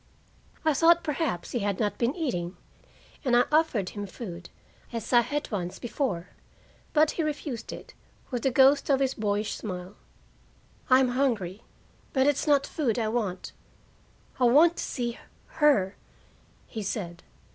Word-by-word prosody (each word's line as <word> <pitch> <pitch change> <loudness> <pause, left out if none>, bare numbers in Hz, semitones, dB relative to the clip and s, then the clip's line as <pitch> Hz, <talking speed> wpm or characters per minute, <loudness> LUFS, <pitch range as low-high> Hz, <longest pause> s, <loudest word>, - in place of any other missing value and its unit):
I 315 - +4
thought 335 +4 +5
perhaps 300 - -2
he 240 - -1
had 200 -2 -1
not 205 -2 -1
been 240 +4 +1
eating 185 - -3 0.7
and 250 -4 +2
I 245 - +6
offered 300 - +2
him 205 -1 -6
food, 180 -4 -8 0.4
as 230 0 -4
I 240 - +8
had 290 +4 -3
once 180 -4 -3
before. 225 - -3 0.6
But 305 0 +4
he - - -2
refused 290 -6 -4
it, - - -10 0.4
with 245 -2 -2
the 270 - +2
ghost 270 +3 +5
of 275 -2 +4
his 270 -1 +1
boyish 210 -1 -1
smile. 180 -2 -6 1.0
"I'm 255 0 +5
hungry, 230 -7 0 0.5
but 265 -1 +3
it's 290 +1 +1
not 285 -2 +4
food 255 -9 -1
I 220 -2 0
want. 210 -6 -2 0.9
I 250 - +4
want 315 +8 +6
to - - -2
see 240 -2 -3 0.4
her," 240 -11 +3 0.7
he 220 - -6
said. 180 -4 -4
240 Hz, 150 wpm, -27 LUFS, 205-285 Hz, 1.0 s, I